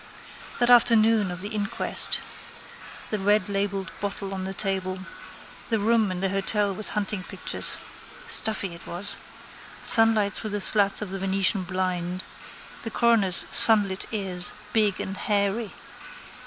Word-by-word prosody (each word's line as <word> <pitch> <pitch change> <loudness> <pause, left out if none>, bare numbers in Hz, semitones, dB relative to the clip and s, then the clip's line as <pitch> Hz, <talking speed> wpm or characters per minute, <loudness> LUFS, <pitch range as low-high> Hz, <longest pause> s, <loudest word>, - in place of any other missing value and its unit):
That 240 0 +2
afternoon 225 -4 +5
of 180 +1 -7
the 205 - -3
inquest. 210 -2 +1 0.9
The 215 - -2
redlabelled 200 -1 -1
bottle 200 -1 -5
on 190 -1 -5
the 190 - -5
table. 190 -2 -2 0.7
The 225 - +1
room 220 0 +1
in 185 0 -5
the 195 - 0
hotel 195 +1 -1
with 210 +3 -3
hunting 205 -1 -2
pictures. - - -2 0.5
Stuffy 205 -4 +2
it 170 - -13
was. 180 +4 -1 0.7
Sunlight 225 -3 +6
through 215 - -4
the 205 0 -2
slats 200 0 +2
of 195 - -8
the 195 - -5
Venetian 190 0 0
blind. 185 0 -3 0.6
The 225 - -6
coroner's 220 -5 +3
sunlit 205 -4 +3
ears, 190 -5 -1 0.2
big 210 -3 +1
and 195 - -5
hairy. 205 +2 -1
200 Hz, 135 wpm, -24 LUFS, 190-215 Hz, 0.9 s, Sunlight